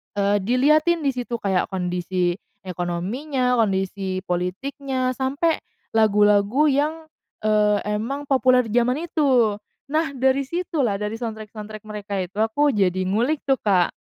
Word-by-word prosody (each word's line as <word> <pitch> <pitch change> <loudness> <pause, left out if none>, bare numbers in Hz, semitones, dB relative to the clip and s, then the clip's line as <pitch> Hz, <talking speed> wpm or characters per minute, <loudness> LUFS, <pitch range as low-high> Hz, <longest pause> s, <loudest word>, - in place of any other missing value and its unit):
eee, 200 0 +2
dilihatin 300 - +2
di 275 - +2
situ 245 -1 -4
kayak 195 -5 0
kondisi 180 -1 -1 0.3
ekonominya, 225 - -1
kondisi 190 -2 -1
politiknya 255 +9 -2
sampai 275 +6 0 0.3
lagu-lagu 210 +3 +3
yang, 295 +3 +1 0.5
eee, 210 -1 +3 0.2
emang 275 +6 -4
populer 255 -2 +3
di 240 - +4
jaman 250 +7 0
itu. 255 -11 +2 0.3
Nah, 310 -3 0
dari 265 +1 +1
situlah 320 - -1
dari 210 +3 -4
soundtrack-soundtrack 215 -2 -7
mereka 210 -1 -6
itu, 190 +4 -8
aku 280 +7 +2
jadi 185 -4 +1
ngulik 235 +11 0
tuh, 270 -2 +1
Kak. 185 -4 +2
225 Hz, 130 wpm, -23 LUFS, 200-270 Hz, 0.5 s, di